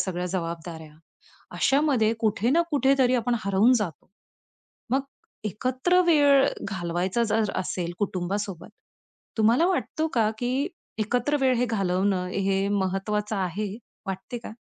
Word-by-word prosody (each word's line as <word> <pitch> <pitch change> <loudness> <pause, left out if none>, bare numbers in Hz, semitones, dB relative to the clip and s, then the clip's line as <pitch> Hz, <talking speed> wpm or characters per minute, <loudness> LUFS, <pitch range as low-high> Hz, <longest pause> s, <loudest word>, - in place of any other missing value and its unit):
सगळ्या 180 -1 -2
जबाबदाऱ्या. 165 -3 -5 0.6
अशामध्ये 270 -6 +3
कुठे 220 +1 +1
ना 330 +6 +4
कुठेतरी 270 -3 +3
आपण 240 0 0
हरवून 200 +5 +4
जातो. 175 -7 -5 0.8
मग 265 +2 +3 0.5
एकत्र 255 - +1
वेळ 285 -4 +5 0.2
घालवायचा 185 +3 -1
जर 215 -2 +1
असेल 180 -2 -2
कुटुंबासोबत 195 -1 -3 0.7
तुम्हाला 230 +10 +4
वाटतो 330 -3 -1
का, 225 -3 +3
की 255 +4 -1 0.3
एकत्र 245 +7 +1
वेळ 260 -1 +3
हे 245 - +2
घालवणं 190 -2 0
हे 195 +1 0
महत्वाचं 205 +2 -1
आहे 195 +2 -2 0.3
वाटते 195 +6 -5
का? 235 - -9
210 Hz, 120 wpm, -26 LUFS, 190-255 Hz, 0.8 s, वेळ